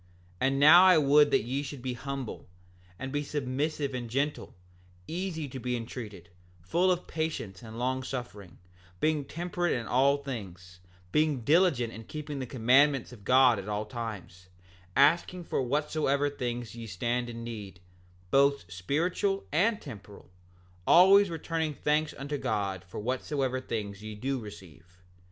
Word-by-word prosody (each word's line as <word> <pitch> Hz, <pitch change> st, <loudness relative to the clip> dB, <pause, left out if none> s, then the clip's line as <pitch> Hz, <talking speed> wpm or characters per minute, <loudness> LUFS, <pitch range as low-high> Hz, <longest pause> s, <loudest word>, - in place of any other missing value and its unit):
7:23 130 Hz, -, +3 dB
And 135 Hz, 0 st, 0 dB
now 165 Hz, +5 st, +9 dB
I 185 Hz, -2 st, +7 dB
would 145 Hz, 0 st, +5 dB
that -, -, +2 dB
ye 130 Hz, +5 st, -2 dB
should 140 Hz, -3 st, -8 dB
be 130 Hz, -1 st, -2 dB
humble, 135 Hz, 0 st, -6 dB, 0.5 s
and 130 Hz, +5 st, -5 dB
be 145 Hz, +1 st, -1 dB
submissive 145 Hz, 0 st, -2 dB
and 120 Hz, -2 st, -4 dB
gentle; 140 Hz, +5 st, -2 dB, 0.5 s
easy 170 Hz, -3 st, -3 dB
to 130 Hz, -, -7 dB
be 125 Hz, 0 st, -2 dB
entreated; 110 Hz, -7 st, -8 dB, 0.3 s
full 170 Hz, -, +1 dB
of 180 Hz, 0 st, -1 dB
patience 155 Hz, -12 st, -4 dB
and 110 Hz, -1 st, -10 dB
long 130 Hz, +2 st, -1 dB
suffering; 120 Hz, -9 st, -7 dB, 0.4 s
being 155 Hz, +1 st, +1 dB
temperate 175 Hz, +2 st, -2 dB
in 120 Hz, -2 st, -2 dB
all 140 Hz, +4 st, +3 dB
things; 95 Hz, -10 st, -8 dB, 0.3 s
being 150 Hz, -2 st, +2 dB
diligent 145 Hz, -4 st, +3 dB
in 110 Hz, 0 st, -9 dB
keeping 150 Hz, 0 st, -6 dB
the 130 Hz, -, -4 dB
commandments 130 Hz, +3 st, +3 dB
of 105 Hz, -5 st, -14 dB
God 125 Hz, -1 st, +5 dB
at 100 Hz, +1 st, -7 dB
all 105 Hz, +1 st, -2 dB
times; 105 Hz, -6 st, -7 dB, 0.5 s
asking 170 Hz, +6 st, +3 dB
for 160 Hz, -, -1 dB
whatsoever 145 Hz, +1 st, 0 dB
things 120 Hz, -4 st, -4 dB
ye 115 Hz, -1 st, -8 dB
stand 120 Hz, +5 st, -2 dB
in 115 Hz, 0 st, -7 dB
need, 105 Hz, -6 st, -7 dB, 0.5 s
both 140 Hz, -10 st, +3 dB
spiritual 175 Hz, -, -1 dB
and 205 Hz, +8 st, +2 dB
temporal; 105 Hz, -7 st, -11 dB, 0.6 s
always 195 Hz, +3 st, +7 dB
returning 160 Hz, -1 st, -2 dB
thanks 150 Hz, +2 st, +1 dB
unto 145 Hz, +1 st, -4 dB
God 100 Hz, -6 st, -2 dB
for 90 Hz, -, -8 dB
whatsoever 130 Hz, +3 st, -2 dB
things 105 Hz, -5 st, -5 dB
ye 110 Hz, 0 st, -7 dB
do 130 Hz, +5 st, -2 dB
receive. 90 Hz, -5 st, -12 dB
130 Hz, 150 wpm, -29 LUFS, 110-150 Hz, 0.6 s, now